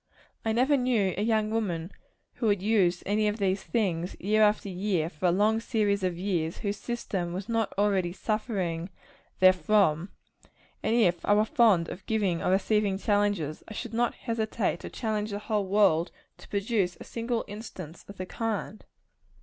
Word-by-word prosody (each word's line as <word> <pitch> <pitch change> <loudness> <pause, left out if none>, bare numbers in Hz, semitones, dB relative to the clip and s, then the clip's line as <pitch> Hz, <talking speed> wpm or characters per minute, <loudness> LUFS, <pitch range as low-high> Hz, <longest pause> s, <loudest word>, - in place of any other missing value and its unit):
I 225 - 0
never 260 +6 +3
knew 235 -7 +1
a 200 - -2
young 215 -1 +1
woman 185 -6 -2 0.5
who 230 - 0
had 205 -2 +3
used 195 -5 +2
any 210 +2 +1
of 210 +1 -1
these 195 -2 0
things, 180 -6 -1
year 215 +3 +2
after 210 -1 +3
year, 180 -3 -1
for 170 +4 -1
a - - +4
long 210 +5 +3
series 210 -3 0
of 180 -2 -1
years, 175 -4 -1
whose 205 0 -3
system 195 -8 -3
was 190 +2 -5
not 225 -2 0
already 195 -4 +2
suffering 190 -4 -2 0.5
therefrom; 185 -2 +4 0.7
and 225 - +1
if 180 -7 +3
I 205 - +4
were 210 +1 +4
fond 220 - +4
of 190 - -8
giving 200 -6 0
or - - 0
receiving 200 +1 +2
challenges, 205 -7 0
I 220 - -8
should 235 +1 -6
not 240 +1 +1
hesitate 220 -5 -2
to - - -7
challenge 215 -2 -2
the 205 - -3
whole 210 -1 -1
world 190 -4 +3 0.3
to - - -14
produce 200 -3 0
a - - -8
single 230 0 -3
instance 200 -6 -9
of 200 - -11
the 185 - -4
kind. 215 0 -4
205 Hz, 175 wpm, -28 LUFS, 185-220 Hz, 0.7 s, a